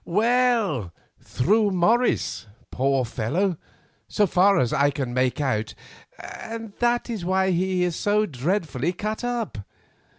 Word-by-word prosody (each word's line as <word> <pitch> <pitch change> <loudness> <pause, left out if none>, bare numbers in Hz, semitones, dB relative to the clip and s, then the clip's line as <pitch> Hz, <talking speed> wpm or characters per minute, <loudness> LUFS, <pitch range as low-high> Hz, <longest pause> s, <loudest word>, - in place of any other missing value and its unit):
"Well, 220 - +1 0.3
through 210 - +1
Morris, 200 - +1 0.2
poor 135 0 +1
fellow, 155 - -1 0.5
so 210 - +2
far 195 +2 +3
as 125 0 +1
I 145 -1 +3
can 135 -4 -4
make 130 +3 0
out, 110 -7 -1 0.4
and 225 -2 -8
that 240 0 +1
is 225 -7 -4
why 190 +1 +1
he 180 +1 0
is 175 -2 -1
so 210 +3 +1
dreadfully 160 0 -2
cut 215 +5 -4
up. 240 - -3
185 Hz, 130 wpm, -24 LUFS, 135-215 Hz, 0.5 s, far